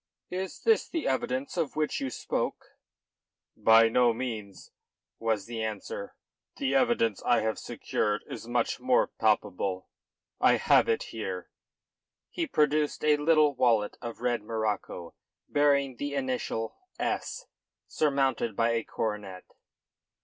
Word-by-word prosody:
"Is 185 Hz, +1 st, -4 dB
this 450 Hz, -1 st, +3 dB
the 330 Hz, -, -2 dB
evidence 130 Hz, +3 st, -1 dB
of 165 Hz, -4 st, -1 dB
which 155 Hz, 0 st, -1 dB
you 135 Hz, -, -1 dB
spoke?" -, -, -3 dB, 0.8 s
"By 115 Hz, 0 st, +6 dB
no 120 Hz, +1 st, +4 dB
means," 110 Hz, -6 st, -6 dB, 0.5 s
was 110 Hz, -3 st, 0 dB
the 115 Hz, -1 st, -5 dB
answer. 470 Hz, -, -5 dB, 0.4 s
"The 275 Hz, -2 st, 0 dB
evidence 235 Hz, -, +2 dB
I 120 Hz, -, +3 dB
have 110 Hz, 0 st, -1 dB
secured 105 Hz, 0 st, -2 dB
is -, -, -7 dB
much -, -, 0 dB
more -, -, +3 dB
palpable. 95 Hz, 0 st, 0 dB, 0.5 s
I -, -, +5 dB
have -, -, +4 dB
it 450 Hz, -1 st, +1 dB
here." -, -, -5 dB, 0.8 s
He 340 Hz, -2 st, -2 dB
produced 150 Hz, -, +1 dB
a 150 Hz, -1 st, +5 dB
little 150 Hz, -1 st, +4 dB
wallet 115 Hz, -5 st, +2 dB
of 120 Hz, -1 st, -7 dB
red 120 Hz, -2 st, 0 dB
morocco 105 Hz, -5 st, -3 dB, 0.3 s
bearing 140 Hz, -3 st, +2 dB
the 145 Hz, +2 st, -3 dB
initial 130 Hz, -4 st, -2 dB, 0.2 s
"S" -, -, -2 dB, 0.4 s
surmounted 135 Hz, -7 st, +1 dB
by 115 Hz, +2 st, +2 dB
a 115 Hz, -1 st, 0 dB
coronet. 105 Hz, -5 st, -4 dB
125 Hz, 130 wpm, -29 LUFS, 110-150 Hz, 0.8 s, By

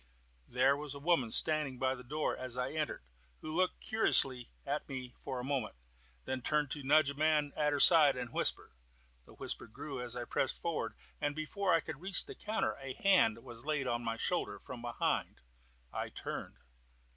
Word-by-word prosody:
There 130 Hz, +3 st, +3 dB
was 145 Hz, -1 st, -6 dB
a -, -, -7 dB
woman 145 Hz, -6 st, +2 dB
standing 150 Hz, 0 st, +4 dB
by 130 Hz, +1 st, +1 dB
the 125 Hz, -1 st, -9 dB
door 150 Hz, +5 st, -2 dB
as 130 Hz, -1 st, +1 dB
I 125 Hz, +1 st, -2 dB
entered, 150 Hz, -, -3 dB, 0.4 s
who 155 Hz, 0 st, -5 dB
looked 185 Hz, +1 st, 0 dB
curiously 130 Hz, -, +2 dB, 0.2 s
at 145 Hz, +2 st, -3 dB
me 130 Hz, -2 st, -6 dB
for 130 Hz, -2 st, -4 dB
a -, -, -5 dB
moment, 130 Hz, -, -2 dB, 0.5 s
then 130 Hz, -1 st, -3 dB
turned 150 Hz, +1 st, 0 dB
to 145 Hz, -, -3 dB
nudge 140 Hz, +1 st, +4 dB
a -, -, -7 dB
man 150 Hz, 0 st, +1 dB
at 150 Hz, -1 st, +1 dB
her 145 Hz, -, 0 dB
side, 155 Hz, -3 st, +8 dB
and 125 Hz, -2 st, -6 dB
whisper. -, -, 0 dB, 0.6 s
The -, -, -15 dB
whisper -, -, -4 dB
grew 135 Hz, +4 st, -7 dB
as 125 Hz, 0 st, -6 dB
I 120 Hz, -1 st, -4 dB
pressed 130 Hz, -, -1 dB
forward, 170 Hz, -2 st, -3 dB, 0.3 s
and 145 Hz, 0 st, -1 dB
before 180 Hz, +5 st, -1 dB
I 165 Hz, -, +4 dB
could 145 Hz, -, -8 dB
reach 190 Hz, +1 st, +5 dB
the 415 Hz, -, -8 dB
counter 220 Hz, -, -2 dB
a 135 Hz, -1 st, -6 dB
hand 150 Hz, -, +3 dB
was 120 Hz, -1 st, -10 dB
laid 150 Hz, -3 st, 0 dB
on 120 Hz, -1 st, -1 dB
my 115 Hz, 0 st, -2 dB
shoulder -, -, -1 dB
from 125 Hz, -2 st, -9 dB
behind. 120 Hz, -, -2 dB, 0.5 s
I -, -, -3 dB
turned. -, -, -6 dB
140 Hz, 190 wpm, -33 LUFS, 125-155 Hz, 0.6 s, side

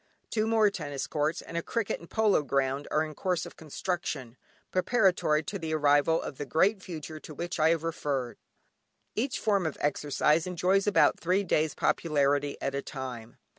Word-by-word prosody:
Two 215 Hz, -1 st, +1 dB
more 220 Hz, -2 st, +4 dB
tennis 145 Hz, -7 st, -4 dB
courts, 150 Hz, +1 st, -1 dB
and -, -, -10 dB
a -, -, +1 dB
cricket 230 Hz, +4 st, -2 dB
and 170 Hz, -, -14 dB
polo 220 Hz, -6 st, +3 dB
ground 140 Hz, 0 st, -1 dB
are 155 Hz, -, +2 dB
in 155 Hz, -1 st, -6 dB
course 180 Hz, +2 st, -1 dB
of -, -, -11 dB
construction, 155 Hz, -6 st, -4 dB, 0.4 s
preparatory 185 Hz, -6 st, +2 dB
to 200 Hz, +5 st, -5 dB
the 160 Hz, -2 st, -2 dB
arrival 145 Hz, +2 st, +4 dB
of 135 Hz, -, -7 dB
the 145 Hz, -, -3 dB
Great 190 Hz, +7 st, +2 dB
Future 160 Hz, -3 st, -7 dB
to 155 Hz, -, -10 dB
which 175 Hz, +4 st, -4 dB
I 155 Hz, +1 st, +5 dB
have 165 Hz, -1 st, +1 dB
referred. 140 Hz, -6 st, -2 dB, 0.7 s
Each 250 Hz, +4 st, -1 dB
form 200 Hz, -6 st, +1 dB
of 155 Hz, -, -5 dB
exercise 150 Hz, +3 st, +1 dB
enjoys 185 Hz, +3 st, +1 dB
about 205 Hz, -, +4 dB
three 185 Hz, +4 st, +1 dB
days 155 Hz, -5 st, +1 dB
popularity 145 Hz, -2 st, +1 dB
at 140 Hz, -, -2 dB
a 140 Hz, -, -1 dB
time. 125 Hz, -5 st, -7 dB
160 Hz, 175 wpm, -29 LUFS, 145-185 Hz, 0.7 s, I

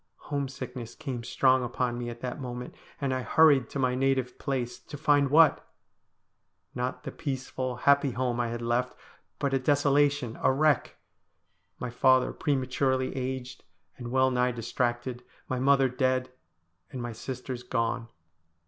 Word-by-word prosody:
Home 140 Hz, -1 st, 0 dB
sickness 125 Hz, -3 st, -7 dB
came 130 Hz, -6 st, -5 dB
strong 130 Hz, +2 st, +3 dB
upon 120 Hz, 0 st, -2 dB
me 120 Hz, -1 st, -4 dB
at 120 Hz, 0 st, -9 dB
that 125 Hz, +2 st, -4 dB
moment, 125 Hz, -1 st, -6 dB, 0.3 s
and 135 Hz, -2 st, 0 dB
I 130 Hz, -, -1 dB
hurried 140 Hz, +1 st, +4 dB
to -, -, -5 dB
my 130 Hz, -2 st, +1 dB
native 130 Hz, -1 st, 0 dB
place, 125 Hz, -3 st, -3 dB
to 145 Hz, -, -10 dB
find 145 Hz, -2 st, +3 dB
what? 155 Hz, +1 st, +5 dB, 1.1 s
Not 125 Hz, +1 st, -3 dB
the -, -, -5 dB
peaceful, 130 Hz, -3 st, -4 dB
happy 140 Hz, +2 st, +3 dB
home 125 Hz, -1 st, -1 dB
I 120 Hz, -, +1 dB
had 120 Hz, 0 st, -4 dB
left, 120 Hz, +2 st, 0 dB, 0.4 s
but 140 Hz, -2 st, -1 dB
a 135 Hz, -, +3 dB
desolation, 145 Hz, -2 st, +2 dB
a -, -, +4 dB
wreck. 145 Hz, 0 st, +2 dB, 0.8 s
My 125 Hz, -, -5 dB
father 130 Hz, +1 st, +3 dB
prematurely 130 Hz, -2 st, 0 dB
aged 130 Hz, 0 st, -4 dB, 0.3 s
and 120 Hz, -2 st, -7 dB
well 130 Hz, +1 st, +3 dB
nigh 125 Hz, 0 st, +1 dB
distracted, 120 Hz, +1 st, -2 dB, 0.2 s
my 130 Hz, -, -2 dB
mother 135 Hz, 0 st, +4 dB
dead, 130 Hz, 0 st, 0 dB, 0.6 s
and 130 Hz, -, -6 dB
my 120 Hz, 0 st, -4 dB
sisters 125 Hz, +1 st, -6 dB
gone. 115 Hz, -1 st, -1 dB
130 Hz, 150 wpm, -28 LUFS, 125-135 Hz, 1.1 s, what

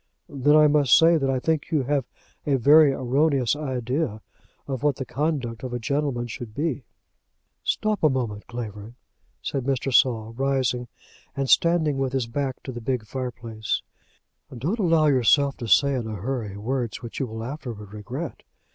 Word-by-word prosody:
"Then 145 Hz, -1 st, +2 dB
I 155 Hz, 0 st, +7 dB
must 145 Hz, -4 st, +5 dB
say 165 Hz, +1 st, +5 dB
that 135 Hz, -1 st, 0 dB
I 135 Hz, -, +1 dB
think 160 Hz, +2 st, -1 dB
you 150 Hz, -4 st, +1 dB
have 140 Hz, -1 st, 0 dB, 0.4 s
a 140 Hz, -, +3 dB
very 145 Hz, +3 st, +6 dB
erroneous 135 Hz, 0 st, +1 dB
idea 130 Hz, -4 st, -2 dB, 0.4 s
of 135 Hz, -3 st, -3 dB
what 145 Hz, -2 st, +2 dB
the 135 Hz, -, -5 dB
conduct 135 Hz, -4 st, -2 dB
of 130 Hz, -2 st, -5 dB
a 120 Hz, -, -2 dB
gentleman 140 Hz, 0 st, -1 dB
should 120 Hz, -2 st, -8 dB
be." 145 Hz, -4 st, -2 dB, 0.8 s
"Stop 215 Hz, -1 st, 0 dB
a 155 Hz, -, +5 dB
moment, 115 Hz, -6 st, -3 dB
Clavering," 110 Hz, -2 st, -7 dB, 0.5 s
said 135 Hz, -, -2 dB
Mr. 135 Hz, -1 st, -1 dB
Saul, 115 Hz, -3 st, +3 dB
rising, 130 Hz, -2 st, 0 dB, 0.5 s
and 135 Hz, -1 st, 0 dB
standing 170 Hz, -5 st, +3 dB
with 135 Hz, -1 st, -1 dB
his 130 Hz, -3 st, 0 dB
back 130 Hz, +2 st, -3 dB
to 130 Hz, -, -6 dB
the 120 Hz, -1 st, -7 dB
big 120 Hz, -1 st, -2 dB
fireplace. 115 Hz, -2 st, -4 dB, 0.7 s
"Don't 170 Hz, -, -2 dB
allow 165 Hz, -5 st, +3 dB
yourself 140 Hz, 0 st, +4 dB
to 120 Hz, -, -6 dB
say 140 Hz, +8 st, +4 dB
in 120 Hz, -4 st, -2 dB
a 110 Hz, -, -4 dB
hurry 105 Hz, -1 st, -4 dB
words 120 Hz, +2 st, -3 dB
which 115 Hz, -, -6 dB
you 135 Hz, -, -1 dB
will 110 Hz, 0 st, -6 dB
afterwards 115 Hz, -7 st, -7 dB
regret. 130 Hz, +9 st, -6 dB
130 Hz, 170 wpm, -24 LUFS, 120-145 Hz, 0.8 s, I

